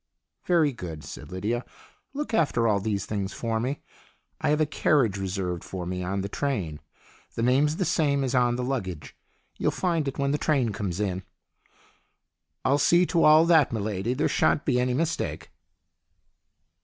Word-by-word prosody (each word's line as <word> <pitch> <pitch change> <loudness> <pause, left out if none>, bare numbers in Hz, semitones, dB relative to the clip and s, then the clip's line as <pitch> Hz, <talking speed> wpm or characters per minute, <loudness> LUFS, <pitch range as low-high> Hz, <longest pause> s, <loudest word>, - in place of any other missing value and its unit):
" - - -48
Very 165 -5 +4
good," 85 -9 -7
said - - -9
Lydia. 110 +7 -2 0.3
" - - -37
Look 290 -5 -4
after 145 - +2
all 105 -2 +2
these 100 0 -2
things 100 -1 -3
for 115 -1 -2
me. 130 +5 -3 0.6
I - - +1
have 150 +1 +2
a 155 - +4
carriage 140 -7 +2
reserved 90 -2 -3
for 90 -2 -6
me 90 +1 -3
on 95 +2 -2
the 100 - -3
train. 100 - -2 0.6
The 115 - -1
name's 140 +5 +3
the 185 - -1
same 140 -4 +1
as 130 - -1
on 120 -2 +3
the 125 - -2
luggage. 95 - -4 0.4
You'll - - +2
find 170 -5 -1
it 135 - -4
when 140 0 0
the 145 - 0
train 135 -7 +1
comes 100 -3 -4
in." 95 -3 -1 1.4
"I'll 140 +2 +3
see 175 +5 +4
to 170 -1 +1
all 155 +2 +7
that, 160 -5 +5
m'lady. 110 +2 -2
There - - +2
shan't 145 - +1
be 125 -3 +2
any 125 0 +1
mistake." 165 +3 -2
125 Hz, 180 wpm, -26 LUFS, 100-150 Hz, 1.4 s, all